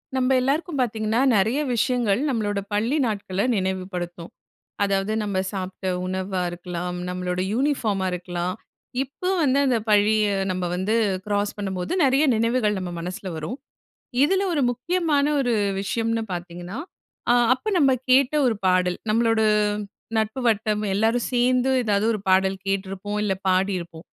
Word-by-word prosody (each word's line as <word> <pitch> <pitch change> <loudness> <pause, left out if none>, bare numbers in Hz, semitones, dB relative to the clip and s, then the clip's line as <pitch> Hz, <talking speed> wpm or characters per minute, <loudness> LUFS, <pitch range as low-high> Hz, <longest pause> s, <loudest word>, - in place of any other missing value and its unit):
நம்ம 255 0 +1
எல்லாருக்கும் 285 +3 -1
பார்த்தீங்கன்னா, 220 -1 0 0.2
நெறய 220 +8 +2 0.2
விஷயங்கள் 235 -2 +1
நம்மளோட 205 -5 -1
பள்ளி 225 +7 +1
நாட்கள 200 -3 -2
நினைவுபடுத்தும். 185 -3 -3 0.5
அதாவது, 195 +1 0
நம்ம 200 -2 -2
சாப்ட்ட 190 -1 -4 0.2
உணவா 185 0 -2
இருக்கலாம். 175 0 -5
நம்மளோட 180 0 -2
யூனிஃபார்மா 225 -7 0
இருக்கலாம். 180 0 -3 0.5
இப்ப 275 +7 -8 0.2
வந்து 275 -2 +3
அந்த 255 -3 +3
பள்ளிய 210 +1 +4 0.2
நம்ம 185 0 -2
வந்து 190 +4 0 0.3
கிராஸ் 205 0 0
பண்ணும்போது, 190 -3 -3
நெறய 270 +2 +4
நினைவுகள் 225 -2 +1
நம்ம 185 -1 -4
மனசுல 180 +3 -5
வரும். 160 - -5 0.7
இதுல 380 +6 +2
ஒரு 295 -4 +1
முக்கியமான 295 +3 +1
ஒரு 245 -3 +1 0.3
விஷயம்னு 225 +3 -1
பாத்தீங்கன்னா, 175 +3 -6 0.5
அ, - - +6 0.2
அப்ப 430 +12 -4
நம்ம 275 -4 +4 0.2
கேட்ட 265 +2 +5
ஒரு 230 -3 +1
பாடல். 180 -1 +2
நம்மளோட 225 0 +2 0.8
நட்பு 220 +4 -1
வட்டம் 215 -1 0
எல்லாரும் 225 +4 +1
சேர்ந்து, 250 +1 +2
ஏதாவது 205 -1 +1
ஒரு 215 - -3
பாடல் 190 +1 +3
கேட்ருப்போம், 195 +1 -2
இல்ல 195 -2 +1
பாடியிருப்போம். 185 -3 -1
210 Hz, 130 wpm, -24 LUFS, 185-245 Hz, 0.8 s, அ